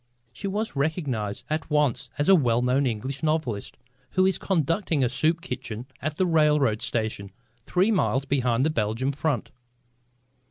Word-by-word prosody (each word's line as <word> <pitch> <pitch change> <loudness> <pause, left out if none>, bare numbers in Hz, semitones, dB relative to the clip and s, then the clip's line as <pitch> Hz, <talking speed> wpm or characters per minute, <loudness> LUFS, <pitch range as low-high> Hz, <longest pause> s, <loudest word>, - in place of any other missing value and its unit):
She 120 - -5
was 210 +1 -2
recognised 140 - -2
at 155 +1 -3
once 150 -5 +1
as 145 - 0
a 195 - +8
well 125 -8 +3
known 130 +2 +2
English 130 +4 -3
novelist 155 -10 -1 0.4
who 185 0 +4
is 190 - +2
conducting 165 -3 +1
a 125 - +2
soup 160 +5 +1
kitchen 125 -7 -5 0.2
at 155 +2 -3
a 185 - +4
railroad 150 -9 +3
station 110 -3 -2 0.4
three 185 +5 +2
miles 140 - +1
behind 130 -2 +1
the 155 - +2
Belgian 115 +2 0
front. 145 -3 -2
140 Hz, 155 wpm, -26 LUFS, 120-160 Hz, 0.4 s, a